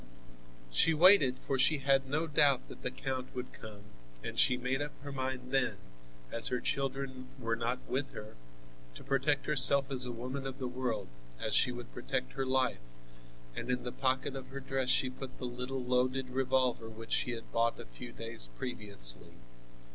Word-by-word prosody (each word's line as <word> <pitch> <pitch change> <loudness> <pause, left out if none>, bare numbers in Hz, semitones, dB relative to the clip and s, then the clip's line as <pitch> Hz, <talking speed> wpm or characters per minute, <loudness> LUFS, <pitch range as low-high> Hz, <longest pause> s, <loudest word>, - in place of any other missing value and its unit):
She 160 - +5
waited, 160 -6 +7
for 135 0 -2
she 155 +4 +4
had 135 -1 +2
no 155 +4 0
doubt 145 -4 +3
that - - -10
the - - -1
count 130 -1 -4
would 125 0 -5
come, 105 -2 -10 0.4
and - - -3
she 125 - +5
made 130 +2 -1
up 145 0 -3
her 145 - -6
mind 130 -1 -3
then, 135 -2 +2 0.5
as 115 - +2
her 125 - 0
children 135 -1 -2
were 115 -3 -1
not 115 +2 -1
with 135 +1 -1
her, 105 0 -9 0.6
to - - -10
protect 135 +1 +1
herself 140 -1 +5
as 130 -1 +5
a - - -3
woman 130 +3 -4
of 135 - -6
the 130 - -3
world 125 -2 -2 0.3
as - - -2
she 125 - +5
would 120 -1 -8
protect 125 +1 -3
her 135 -1 -2
life, 130 - +1 0.7
and - - -5
in 125 0 0
the 125 - -4
pocket 130 +1 0
of 130 -1 -6
her 135 +1 -7
dress 135 -1 -1
she 130 - +4
put 130 0 -8
the 125 - -5
little 125 +1 -4
loaded 125 +1 0
revolver 130 -3 +1
which 115 +1 -10
she 125 - +1
had 115 -1 -8
bought 115 0 +1
a - - -7
few - - -10
days - - -3
previously. 100 - -2
130 Hz, 185 wpm, -33 LUFS, 125-135 Hz, 0.7 s, waited